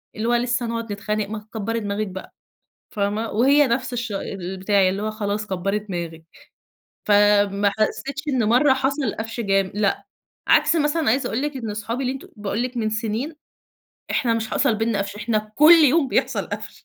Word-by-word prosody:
اللي 220 +2 -2
هو 240 - +2
لسه 240 0 0
هنقعد 230 -1 -4
نتخانق، 210 0 -2
ما 220 -1 -4
تكبري 220 +1 -4
دماغك 205 0 -2
بقى، 190 0 -9 0.6
فاهمة؟ 210 +2 -1
وهي 275 +6 +4
نفس 250 +1 -1
الش 235 -3 -3
البتاع 190 0 0
اللي 195 +2 -3
هو 215 - -2
خلاص 210 -1 -3
كبري 195 +2 -1
دماغك. 170 -5 -6 0.9
فما 205 -1 +4
حسيتش 275 +6 -1
إن 255 -5 +1
مرة 250 +6 +4
حصل 270 -2 -1
قفش 225 +2 -5
جام 195 -3 +1
لأ، 205 -1 0 0.4
عكس 335 - +4
مثلًا 300 -2 +1
عايزة 260 +5 +1
أقول 235 - -2
لِك 295 -1 -3
إن 230 -4 -5
أصحابي 225 +4 -4
اللي 255 0 -1
أنت 270 - -9
باقول 210 +2 -2
لِك 250 0 -4
من 220 -2 0
سنين، 225 +8 -3 0.8
إحنا 235 -3 +1
مش 225 -1 -3
حصل 260 -6 +2
بيننا 225 -1 0
قفش، 200 +1 -3
إحنا 215 -1 -2
كُلّ 305 +6 +8
يوم 290 0 +3
بيحصل - - 0
قفش - - -8
220 Hz, 180 wpm, -22 LUFS, 205-250 Hz, 0.9 s, كُلّ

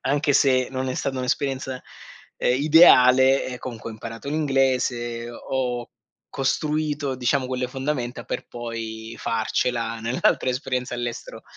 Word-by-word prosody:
anche 145 +2 +1
se 130 -2 +3
non 130 0 -2
è 130 - -2
stata 135 0 -2
un'esperienza, 130 0 -2
ehm, - - -32 0.8
ideale 135 -4 +6
eh, 125 -1 -6
comunque 115 -3 -7
ho - - -7
imparato 115 +4 -8
l'inglese, 130 -5 0
ho 125 0 -3 0.4
costruito 150 +1 -1
diciamo 130 +1 0
quelle 125 -1 -2
fondamenta 130 -3 -3
per - - -5
poi 115 -1 -6
farcela 115 0 -1
nell'altra 115 +2 +1
esperienza 125 -1 -3
all'estero 120 -1 -5
130 Hz, 125 wpm, -24 LUFS, 120-135 Hz, 0.8 s, ideale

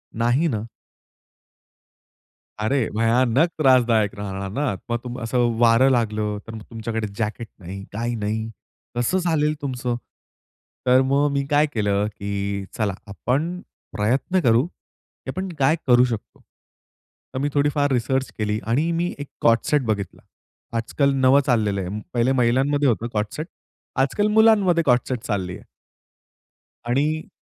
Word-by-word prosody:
नाही 120 +8 +2
ना. 110 -6 -2 2.0
अरे, 125 +1 +1
भयानक 120 +7 +3
त्रासदायक 120 -7 +4
राहणार 100 -1 -5
ना, 135 -3 -1
मग 120 - +1
तुम 125 +1 -6
असं 120 +1 +1
वारं 120 +3 +5
लागलं, 110 -3 0
तर 115 - -7
मग 110 - -8
तुमच्याकडे 115 -1 -3
जॅकेट 110 +1 -3
नाही, 95 +2 -8
काही 120 +2 -2
नाही, 110 +1 -2 0.5
कसं 120 +10 +1
झालेलं 160 -4 +1
तुमचं? 125 -3 -2 0.9
तर 130 +1 +5
मग 140 +2 +2
मी 140 0 0
काय 145 +1 +4
केलं, 105 -1 +1
की 100 -1 -4
चला 105 -4 0
आपण 145 - -2 0.4
प्रयत्न 130 - +1
करू, 120 +3 +4
की 175 - -16
आपण 185 0 -4
काय 135 +4 +4
करू 125 0 +6
शकतो? 115 -4 -5 0.9
तर 130 - -2
मी 145 +1 0
थोडीफार 145 0 +2
रिसर्च 130 +1 0
केली 105 0 -1
आणि 150 +9 +1
मी 170 +1 -1
एक 145 - -5
को-ऑर्ड 115 0 +5
सेट 150 -2 +3
बघितला. 105 -3 -3 0.6
आज-काल 140 +5 +1
नवं 135 +1 +5
चाललेलं 105 -6 +1
आहे. 100 +4 -4
पहिले 120 +2 +2
महिलांमध्ये 135 +3 +2
होतं 115 +1 0
को-ऑर्ड 105 -2 -1
सेट, 155 +2 -4 0.5
आज-काल 145 +11 +1
मुलांमध्ये 200 -7 +5
को-ऑर्ड 125 -3 +4
सेट 125 - -1
चाललं 95 -5 -2
आहे. - - -11 1.2
आणि 150 +5 0
120 Hz, 140 wpm, -23 LUFS, 110-140 Hz, 2.0 s, करू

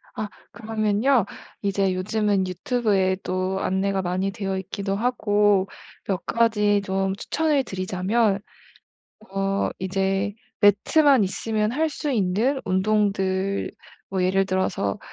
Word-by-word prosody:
아 215 - -3 0.2
그러면요. 220 +1 +1 0.4
이제 195 -2 +1
요즘은 200 0 0
유튜브에도 190 -2 0
안내가 190 +1 0
많이 185 +2 -1
되어 195 -1 -3
있기도 195 +1 -3
하고 205 -4 +2 0.4
몇 190 -3 -2
가지 210 -3 +2
좀 195 0 -1
추천을 300 +4 0
드리자면 195 +2 0 1.0
어 195 0 0
이제 195 +2 0 0.3
매트만 245 +5 +5
있으면 215 +3 -1
할 315 +4 +1
수 295 -1 -3
있는 225 +6 +1
운동들 195 -1 0 0.4
뭐 190 -1 0
예를 195 +1 +2
들어서 185 - -1
195 Hz, 240 characters per minute, -24 LUFS, 190-215 Hz, 1.0 s, 매트만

